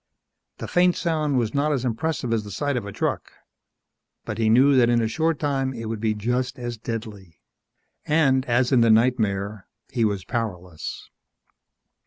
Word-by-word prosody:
The - - -6
faint 180 0 +3
sound 155 -4 0
was 115 -3 0
not 145 +2 +1
as 130 -3 -1
impressive 125 0 -1
as 110 -2 0
the 105 - -9
sight 145 +7 -2
of 115 -4 -3
a - - -6
truck. - - -3 0.9
But 110 0 -5
he 110 -1 +2
knew 135 +5 +5
that 120 -2 +5
in 120 0 +3
a 115 - +1
short 160 +6 0
time 135 -3 -1
it 115 -1 -5
would 110 -1 -3
be 110 0 0
just 125 +4 -2
as 120 -1 -4
deadly. 110 -6 -7 0.7
And, 140 -4 +3
as 125 +1 +1
in 125 -3 +5
the 115 - +4
nightmare, 110 -4 +1 0.2
he 120 - 0
was 100 -4 -1
powerless 90 -9 -5
120 Hz, 175 wpm, -24 LUFS, 110-135 Hz, 0.9 s, knew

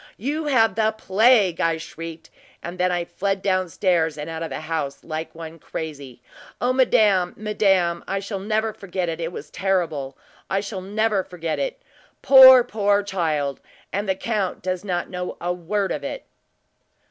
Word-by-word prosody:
`You 295 +7 -2
have 225 -6 +4
the 220 +1 +1
plague!' 210 -3 +3
I 165 -1 +1
shrieked; 165 0 -9 0.3
and 175 +2 -7
then 180 0 +2
I 175 -1 -1
fled 195 +2 -2
down 185 -2 +1
stairs 165 -4 +1
and 150 +2 -5
out 160 0 -5
of 165 - -3
the - - -5
house, 155 -3 -4
like 160 0 -5
one 165 0 -9
crazy. 140 -7 -7 0.4
O 250 +1 +1
madame, 205 -8 +3
madame! 195 -5 +1
I 195 - -1
shall 200 0 -5
never 215 +2 -1
forget 185 -3 -4
it 165 +1 -4
it 165 +1 -3
was 150 -4 -9
terrible! 165 -9 -1 0.3
I 195 - +1
shall 200 -1 -5
never 210 +1 0
forget 170 -3 -4
it! - - -3 0.4
Poor, 260 -2 +10
poor 205 -3 +1
child; 155 -8 -2 0.3
and 200 +1 -2
the 190 - +2
count 205 -2 -2
does 185 0 -2
not 180 -3 -2
know 180 -1 -5
a 175 +1 -1
word 190 +3 -2
of - - -3
it!" - - -5
185 Hz, 170 wpm, -23 LUFS, 165-210 Hz, 0.4 s, Poor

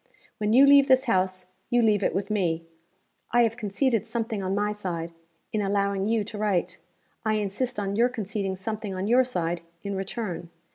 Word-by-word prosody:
When 210 0 0
you 260 +5 +7
leave 280 0 +7
this 260 -1 +5
house, 185 -5 0 0.2
you 240 -1 +3
leave 210 -2 +3
it - - +1
with 200 +2 -2
me. 170 -5 0 0.6
I 240 0 +4
have 230 -1 +1
conceded 225 +1 0
something 225 -2 -2
on 190 +1 -1
my 210 +1 0
side, 175 -5 -4 0.4
in 215 - +1
allowing 200 0 0
you 225 -1 +1
to 210 0 -7
write. 185 -4 0 0.4
I 220 -1 +1
insist 210 +4 -2
on 200 -1 -2
your 235 +3 +4
conceding 205 -4 -3
something, 210 0 -4
on 185 +1 -2
your 245 +4 +5
side, 175 -8 -2 0.2
in 200 -1 -3
return. 190 -3 -4
210 Hz, 185 wpm, -26 LUFS, 190-230 Hz, 0.6 s, you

